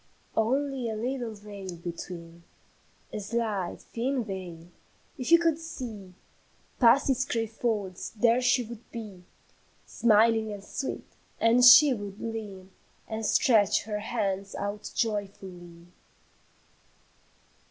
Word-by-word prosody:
"Only 260 +2 0
a 220 - -3
little 240 0 -3
veil 200 -3 -8
between, 170 0 -8 0.7
A - - -3
slight, 210 -3 -2
thin 250 +2 -2
veil; 180 -5 -7 0.5
if 255 +5 -3
you 335 - +10
could 330 -2 +1
see 220 - -8 0.6
Past 240 +3 +5
its 255 0 +1
gray 230 -4 -1
folds, 215 -4 -3
there 235 +2 +3
she 250 0 +3
would 235 0 -11
be, 210 -6 -8 0.6
Smiling 225 -1 +3
and 200 -1 -7
sweet, 270 +6 -5 0.3
and 235 +2 +4
she 265 +3 +9
would 205 -3 -7
lean 205 -5 -6 0.4
And 220 0 -4
stretch 210 -1 +3
her 210 -1 -3
hands 200 -3 -3
out 205 +1 -4
joyfully. 190 -5 -4
220 Hz, 115 wpm, -28 LUFS, 195-240 Hz, 0.7 s, you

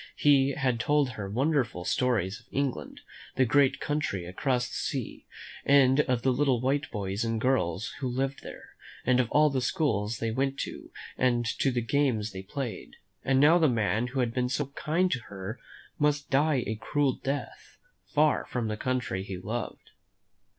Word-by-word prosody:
He 140 -1 +4
had 130 -5 0
told 145 +4 +2
her 100 -3 -6
wonderful 125 - 0
stories 115 -6 0
of - - -24
England, 130 - -3 0.3
the 130 - +3
great 140 +2 +3
country 145 -12 -2
across 125 +7 -1
the - - -11
sea, - - -4 0.4
and 135 -1 +5
of 125 -5 +1
the 130 - +3
little 130 -2 +2
white 135 +3 0
boys 100 0 -3
and 115 -1 -1
girls 110 -6 0
who 130 - -2
lived 135 +2 -2
there, - - -10 0.4
and 130 0 +3
of 145 +4 +3
the 130 - 0
schools 115 - 0
they 115 -1 -2
went 135 +3 -1
to - - -7 0.3
and 120 -2 +2 0.2
the 125 -3 +1
games 115 -4 0
they 95 0 -7
played; 120 +4 -6 0.3
and 135 0 +2
now 160 +5 +6
the 160 -3 +4
man 110 0 +1
who 130 +1 -1
had 120 -2 -1
been 125 0 0
so 140 +1 -2
kind 175 +4 +1
to 130 - 0
her 100 +4 -7 0.4
must 150 -1 +1
die 140 -2 +3
a 110 +1 -4
cruel 145 +2 +1
death, 140 +3 -5 0.3
far 150 0 +2
from 120 -3 -2
the 105 - -3
country 125 -6 -2
he 95 -1 -6
loved. 110 +4 -5
130 Hz, 170 wpm, -28 LUFS, 110-140 Hz, 0.4 s, now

